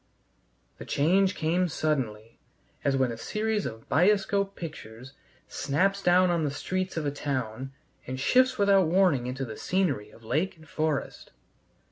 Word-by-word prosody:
The - - -8
change 185 +6 +2
came 175 +3 +1
suddenly, 120 -9 -2 0.4
as 140 -1 +2
when 130 -2 +1
a 115 - -6
series 215 - -1
of 115 -1 -9
bioscope 200 +3 +2
pictures 130 -6 -9 0.3
snaps 195 +8 0
down 180 0 +4
on 170 -2 +1
the 150 - +1
streets 185 +6 -3
of 160 - -1
a 145 - 0
town 130 -3 -4 0.4
and 130 +1 -4
shifts 255 - +3
without 195 -3 +4
warning 165 -8 +3
into 130 +1 -3
the 110 -3 -8
scenery 150 - -1
of 115 - -18
lake 165 +11 -1
and 160 0 -17
forest. 155 -2 -3
155 Hz, 150 wpm, -27 LUFS, 130-190 Hz, 0.4 s, down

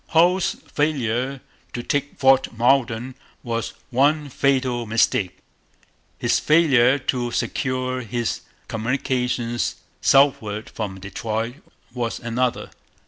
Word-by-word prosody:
Hull's 175 +3 +3
failure 135 -3 -1 0.3
to 120 - -4
take 145 +2 -2
Fort 135 -1 +4
Malden 120 0 +2 0.3
was 115 -1 -3 0.2
one 145 +4 +2
fatal 130 -3 +1
mistake. 105 -4 +1 0.8
His - - +2
failure 140 -5 +4
to 125 -2 -1
secure 130 0 -1
his 120 0 -2 0.3
communications 120 0 -1 0.3
southward 135 -6 +3
from 100 -4 -5
Detroit 110 +5 -3 0.4
was 120 -2 -3
another. 120 +1 -1
125 Hz, 95 wpm, -22 LUFS, 115-140 Hz, 0.8 s, Fort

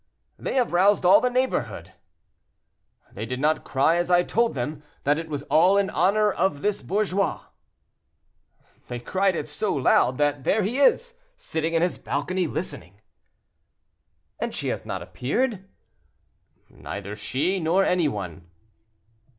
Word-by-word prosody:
"They - - -3
have 250 -8 +1
roused 190 +2 +3
all 195 +4 +7
the 250 - +2
neighborhood." 245 - -2 1.2
"They 110 +3 -6
did 125 +2 -4
not 155 +3 +1
cry 150 +5 +2
as 175 +1 -1
I 175 0 +4
told 230 +2 0
them, 145 +4 -4 0.2
that 145 +2 +2
it 165 -1 -7
was 145 -2 -4
all 175 +6 +4
in 200 -1 +1
honor 210 +2 +2
of 175 -6 -1
this 205 -1 0
bourgeois." 200 -1 -1 1.5
"They 120 - -5
cried 190 +8 0
it 150 - -3
so 190 +7 -2
loud, 130 -1 +3
that 145 -2 0
there 215 +8 +2
he 235 +8 -1
is, 475 - +2 0.2
sitting 165 - -3
in 165 - +3
his 180 - -1
balcony, 175 +6 -2
listening." 100 - -6 1.4
"And - - -3
she - - -2
has - - -4
not - - -4
appeared?" 195 - -2 1.0
"Neither 100 +1 -7
she, 150 - -1
nor 175 +4 +2
any 180 -3 +2
one." 90 - -6
175 Hz, 145 wpm, -24 LUFS, 140-200 Hz, 1.5 s, all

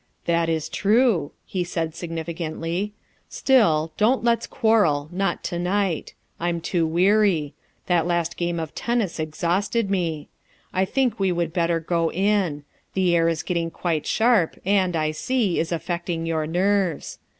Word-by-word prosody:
"That 170 -1 +1
is 160 -2 -1
true," 205 - +2
he 185 -2 -2
said 165 -2 -3
significantly. 165 +3 -4 0.4
"Still, 165 - +3
don't 235 +5 +3
let's 235 -1 +1
quarrel, 175 -11 +2
not 195 +2 -1
to 175 -2 -3
night; 185 -2 -1 0.2
I'm 170 0 -1
too 165 0 0
weary; 180 -3 +2 0.3
that 175 -2 +2
last 170 -1 0
game 175 -1 -2
of 160 -1 -5
tennis 235 -8 -1
exhausted 185 +7 -1
me. 165 -6 -1 0.5
I 190 +1 +2
think 245 +1 0
we 190 -1 +2
would 170 -2 -1
better 170 -1 +1
go 165 0 0
in; 190 -6 +1 0.3
the 185 -2 +3
air 165 0 +3
is 165 -1 -2
getting 170 -2 -1
quite 165 -2 -2
sharp 225 -7 +2
and, 190 -3 +2
I 155 -1 +1
see, 215 +2 0
is 165 - -1
affecting 170 0 -3
your 160 -2 -1
nerves. 185 -1 0
175 Hz, 150 wpm, -23 LUFS, 165-200 Hz, 0.5 s, Still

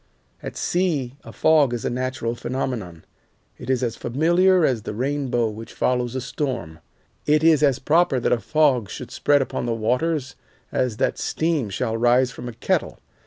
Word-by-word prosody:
At - - -7
sea 155 -9 -1
a - - -10
fog 150 -6 +3
is 120 - -5
a - - +1
natural 125 -2 -2
phenomenon. 120 -9 -4 0.5
It - - -8
is 130 -1 +1
as 115 -2 -1
familiar 175 +8 +3
as 125 -6 0
the 105 - -6
rainbow 130 -2 0
which 110 +2 -9
follows 125 -1 0
a 130 - -2
storm, 125 - -4 0.5
it 150 +1 +3
is 160 -2 +5
as 140 -4 +3
proper 150 0 +2
that - - 0
a 120 - +3
fog 135 -7 +2
should 125 - -8
spread 145 -2 +2
upon 125 - -4
the 115 - 0
waters 130 +5 -1 0.4
as 125 -4 -1
that - - 0
steam 155 -8 -1
shall 110 +3 -2
rise 125 +2 +3
from 125 0 -7
a - - -8
kettle. 115 - -1
130 Hz, 175 wpm, -23 LUFS, 120-150 Hz, 0.5 s, is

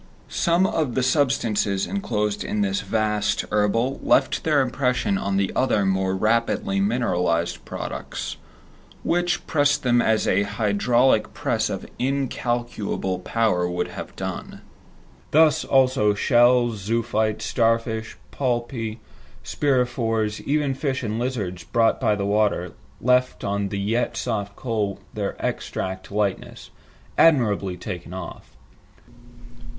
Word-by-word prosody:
Some 170 +2 +2
of 155 -9 -1
the 130 - +1
substances 120 -8 +1
enclosed 105 - -2
in 210 0 -2
this 200 0 0
vast 105 -2 0
herbal 115 +6 +1
left - - +2
their 155 -3 +3
impression 130 +8 0
on 100 0 -1
the 100 -1 +1
other 125 -6 +2
more 95 0 +1
rapidly 110 -2 +1
mineralized 90 -6 0
products, - - -5 0.7
which 175 +1 0
pressed 145 -2 +2
them 120 -1 +3
as 110 -1 +2
an 100 +2 +2
hydraulic 110 +4 +2
press - - 0
of - - -4
incalculable 120 -7 -2
power 90 -3 0
would 90 - -2
have - - -8
done. - - -6 0.7
Thus 155 0 +4
also 130 -6 +3
shells, 120 +1 +4
zoophytes, 110 0 -1
star 115 +1 +3
fish, 110 -1 -6
polypi, 120 -3 -2 0.5
spirifores, 120 -6 0
even 145 -1 +1
fish 135 -1 -2
and 110 0 -2
lizards 105 -9 -3
brought 115 +5 +1
by 105 - +3
the 100 -1 -2
water, 100 -4 +1 0.3
left 125 +1 +2
on 100 0 -1
the 100 - -3
yet 115 +5 -1
soft 105 -4 -3
coal 110 -5 -2
their - - -3
exact 95 +1 -4
likeness, 100 -2 -3 0.5
"admirably 105 - +3
taken 90 0 -7
off." 85 -9 -9
115 Hz, 120 wpm, -23 LUFS, 100-130 Hz, 0.7 s, Thus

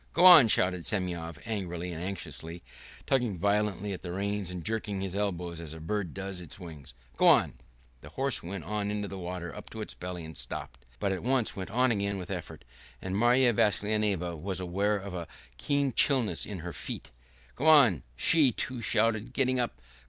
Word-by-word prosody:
"Go 175 - +4
on!" 170 -9 +11
shouted 90 -4 +2
Semyon 85 -4 -3
angrily 90 -5 -4
and 80 - -6
anxiously, 85 -3 -6 0.4
tugging 120 -8 +1
violently 100 +1 0
at 90 - -7
the 90 - -6
reins 100 0 -2
and 90 -2 -6
jerking 105 -3 -2
his 95 -1 -4
elbows 90 -4 -2
as 80 -1 -7
a - - -9
bird 90 +2 -3
does 95 -1 -5
its 85 - -9
wings. 75 -8 -10 0.2
"Go - - +4
on!" - - +6 0.5
The 75 - -11
horse 135 - -1
went 90 0 -6
on 105 +3 -2
into 105 0 -2
the 95 0 -7
water 90 -1 -5
up - - -9
to 110 - -9
his 105 - -5
belly 90 -2 -6
and 80 0 -10
stopped, 60 0 -6
but 100 - -1
at 95 - -2
once 125 -1 +1
went 95 -2 -5
on 125 +4 +2
again 100 -2 -1
with 90 0 -7
an 95 - -1
effort, 85 - -11 0.3
and 95 0 -4
Marya 120 +3 +4
Vassilyevna 105 -4 +1
was 95 +4 -3
aware 100 +4 0
of 100 -1 -7
a 85 -2 -5 0.3
keen 140 -3 0
chilliness 130 -5 +1
in 100 -5 -6
her 90 0 -6
feet. - - -7 0.4
"Go 150 - -2
on!" 135 - +7
she, 145 - +5
too, 125 +2 -4
shouted, 115 +2 +1
getting 130 -1 +1
up. 120 - -2
100 Hz, 195 wpm, -29 LUFS, 90-110 Hz, 0.5 s, on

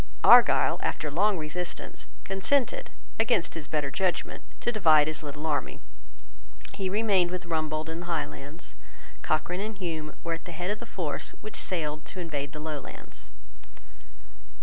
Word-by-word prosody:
Argyle, - - +7
after 150 -1 -1
long 200 +6 +3
resistance, 170 +3 -5 0.2
consented, 265 - +1 0.3
against 215 -6 +2
his 155 -2 -5
better 150 -3 -1
judgment, 180 +5 -1 0.2
to 240 - 0
divide 160 -9 +6
his 155 0 -1
little 150 0 -6
army. 150 -2 -1 0.9
He 190 -1 -2
remained 200 -3 +3
with 180 0 -4
Rumbold 155 -2 -1
in 160 +1 -4
the 175 - -6
Highlands. 150 -1 -4 0.5
Cochrane 175 +4 0
and 215 0 -4
Hume 160 -5 -4
were 165 - -1
at 165 - -6
the 175 - -7
head 175 +4 -2
of 210 - -2
the - - -8
force 165 -6 -3
which 215 - -8
sailed 155 -4 -1
to 185 - -8
invade 145 -5 -3
the 150 - -7
Lowlands. 150 -2 -7
165 Hz, 150 wpm, -28 LUFS, 155-190 Hz, 0.9 s, Argyle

